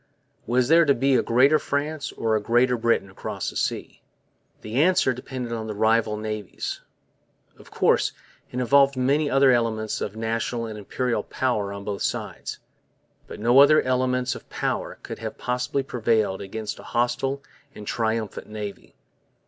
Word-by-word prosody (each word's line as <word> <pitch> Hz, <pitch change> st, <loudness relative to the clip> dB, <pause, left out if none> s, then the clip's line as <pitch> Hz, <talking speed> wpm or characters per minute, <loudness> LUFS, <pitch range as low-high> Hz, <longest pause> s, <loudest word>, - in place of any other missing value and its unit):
Was 125 Hz, +1 st, +2 dB
there 165 Hz, +3 st, +6 dB
to 140 Hz, -3 st, +3 dB
be 135 Hz, +3 st, +2 dB
a -, -, +4 dB
Greater 135 Hz, +6 st, +4 dB
France 145 Hz, +1 st, -2 dB
or 110 Hz, -1 st, 0 dB
a 110 Hz, -, +1 dB
Greater 120 Hz, +3 st, +3 dB
Britain 115 Hz, -3 st, +1 dB
across -, -, -4 dB
the -, -, -16 dB
seas? -, -, -2 dB, 0.6 s
The 115 Hz, +6 st, 0 dB
answer 180 Hz, -6 st, +3 dB
depended 125 Hz, -1 st, -6 dB
on 110 Hz, -1 st, -4 dB
the 105 Hz, -, -4 dB
rival 110 Hz, 0 st, +2 dB
navies. 105 Hz, -2 st, -5 dB, 0.8 s
Of -, -, -15 dB
course, -, -, +2 dB, 0.4 s
it 125 Hz, -, -3 dB
involved 135 Hz, +2 st, +4 dB
many 140 Hz, +4 st, +2 dB
other 135 Hz, 0 st, +5 dB
elements 110 Hz, -3 st, 0 dB
of 105 Hz, -, -4 dB
national 115 Hz, +1 st, -2 dB
and 110 Hz, -1 st, -6 dB
Imperial 120 Hz, +4 st, -2 dB
power 110 Hz, -6 st, -1 dB
on 100 Hz, 0 st, -7 dB
both 100 Hz, -1 st, -4 dB
sides. -, -, -3 dB, 0.7 s
But -, -, -9 dB
no 120 Hz, +5 st, +5 dB
other 150 Hz, +2 st, +7 dB
elements 125 Hz, 0 st, +1 dB
of -, -, -11 dB
power -, -, -2 dB
could -, -, -7 dB
have -, -, -6 dB
possibly 125 Hz, +2 st, -1 dB
prevailed 110 Hz, -6 st, 0 dB
against 105 Hz, +2 st, -5 dB
a -, -, -11 dB
hostile 130 Hz, +3 st, 0 dB, 0.3 s
and 105 Hz, -, -9 dB
triumphant 110 Hz, -2 st, -2 dB
navy. 105 Hz, -2 st, -7 dB
120 Hz, 160 wpm, -24 LUFS, 110-130 Hz, 0.8 s, other